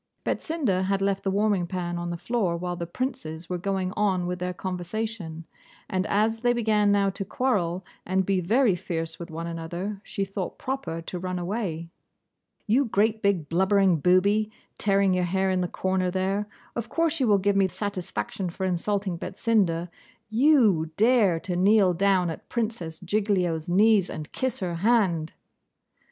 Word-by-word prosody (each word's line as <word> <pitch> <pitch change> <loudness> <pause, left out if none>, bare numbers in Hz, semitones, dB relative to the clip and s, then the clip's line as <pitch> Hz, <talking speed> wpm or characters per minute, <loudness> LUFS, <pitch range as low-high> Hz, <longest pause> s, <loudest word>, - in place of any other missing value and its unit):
Betsinda 245 - 0
had 195 0 +1
left 195 0 0
the 195 - 0
warming 200 -2 +1
pan 175 -1 -3
on 175 0 -3
the 170 - -3
floor 195 -4 -1
while 175 +1 -3
the 170 -1 -5
princes 175 - -4
were 180 - -1
going 190 -1 -1
on 190 -4 +1
with 180 0 -3
their 180 0 -2
conversation, 180 -1 -4 0.4
and 185 +1 -1
as 220 +2 +1
they 240 +1 +2
began 215 -3 +2
now 200 -1 +3
to 195 - -5
quarrel 190 -6 -1 0.2
and 190 +1 0
be 195 0 +1
very 220 +5 +3
fierce 165 -2 -4
with 170 - -7
one 165 +1 -5
another, 170 +4 -5
she 195 - -3
thought 195 -1 -5
proper 260 -11 -4
to 180 +2 -5
run 185 0 -3
away. 175 -3 -3 0.8
'You 245 +6 +3
great 220 0 +1
big 190 -7 +1
blubbering 190 +1 +3
booby, 200 +6 +3 0.3
tearing 195 -2 +3
your 180 -1 +1
hair 190 +2 +1
in 185 -1 +1
the 180 - 0
corner 185 0 0
there; 195 +3 -1 0.3
of 235 -1 -4
course 330 -1 +1
you 260 - +2
will 205 -2 +5
give 200 +1 +1
me 195 -1 +4
satisfaction 190 0 -4
for 190 +3 -4
insulting 185 0 -1
Betsinda. 185 -6 0 0.4
YOU 225 - +4
dare 215 -6 +4
to 180 - -3
kneel 195 0 +4
down 185 -1 +2
at - - -10
Princess 215 -9 -3
Giglio's 180 -4 0
knees 200 +1 +4
and 155 0 -7
kiss 260 -5 -2
her 175 -2 -2
hand! 185 -6 +2
190 Hz, 170 wpm, -26 LUFS, 175-210 Hz, 0.8 s, will